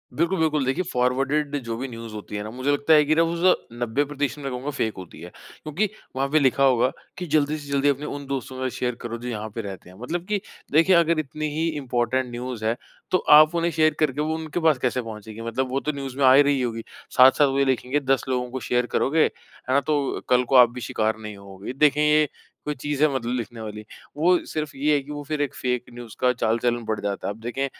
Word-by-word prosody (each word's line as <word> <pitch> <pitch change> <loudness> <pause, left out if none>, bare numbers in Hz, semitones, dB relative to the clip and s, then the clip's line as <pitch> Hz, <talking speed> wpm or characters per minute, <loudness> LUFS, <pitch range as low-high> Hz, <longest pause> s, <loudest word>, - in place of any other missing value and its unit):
बिल्कुल, 170 +3 +1
बिल्कुल। 155 -4 +1
देखिए 135 +7 0
फॉरवर्डेड 135 +4 0
जो 115 -1 -4
भी 135 +3 -4
न्यूज़ 115 -2 -8
होती 105 0 -7
है 105 - -3
ना, 105 - -6
मुझे 130 +3 -1
लगता 145 +2 +3
है 150 -1 +7
कि 155 +2 +2
ना 165 - +4
वो 165 +1 -1
तो 185 0 +3
90% 140 +4 -1
मैं 135 -2 -4
कहूँगा 125 +3 -4
फ़ेक 115 -6 -1
होती 90 -3 -10
है। 90 - -8 0.3
क्योंकि 175 +7 -1 0.3
वहाँ 135 +1 0
पे 155 - +5
लिखा 135 -1 +3
होगा 130 -1 +4 0.3
कि 180 - -4
जल्दी 150 0 +2
से 145 -2 -10
जल्दी 140 0 +2
अपने 140 +1 -1
उन 145 -1 -6
दोस्तों 130 -1 -4
के 130 0 -1
साथ - - -10
शेयर 125 -1 -1
करो 120 0 -5
जो 120 - -8
यहाँ 110 -1 -4
पे 115 - -2
रहते 95 -3 -8
हैं। 90 - -15
मतलब 170 +7 -3
कि 210 -2 -1 0.3
देखिए 165 +5 +5
अगर 170 -1 +3
इतनी 155 +1 -3
ही 160 +1 0
इम्पोर्टेंट 130 -1 0
न्यूज़ 120 -2 -5
है 115 - +1 0.4
तो 185 - +4
आप 155 +2 +8
उन्हें 170 0 +1
शेयर 155 -1 +3
करके 150 -2 +1
वो 155 +1 -1
उनके 160 +1 -4
पास 160 -4 +3
कैसे 125 0 -1
पहुँचेगी? 110 -1 -9
मतलब 120 +3 -2
वो 135 - 0
तो 150 - -2
न्यूज़ 135 -2 -6
में 140 - +3
आ 130 - +8
ही 140 - +8
रही 140 -2 +1
होगी। 115 -2 -3 0.3
साथ-साथ 130 +3 +7
वो 135 0 -1
लिखेंगे 130 +2 0
10 135 -3 +1
लोगों 125 -1 -1
को 130 - -4
शेयर 125 +2 0
करोगे, 155 +3 +3
है - - +3 0.4
ना, 140 - +5
तो 145 -2 -1
कल 125 0 +4
को 130 - -1
आप 125 -2 +8
भी 125 0 -8
शिकार 110 -1 -1
नहीं 105 -2 -8
होगे। 100 +4 -9
देखें 150 +1 +3
ये 150 0 +4 0.4
कोई 150 - -1
चीज 145 +2 -3
है 155 - +6
मतलब 120 -2 -2
लिखने 120 -1 -5
वाली? 105 -1 -7 0.3
वो 175 +4 +4
सिर्फ़ 155 -2 -4
ये 150 +2 +2
है 145 - +2
कि 145 - -11
वो 145 0 -5
फिर 150 0 -3
एक 145 - -1
फ़ेक 125 -1 -1
न्यूज़ 120 -2 -10
का 125 0 +3
चाल 115 -1 0
चलन 120 0 0
बढ़ 110 -1 -2
जाता 100 -1 -3
है। 100 - -2
अब 105 - -16
देखें 120 +4 -2
135 Hz, 250 wpm, -24 LUFS, 120-150 Hz, 0.4 s, आप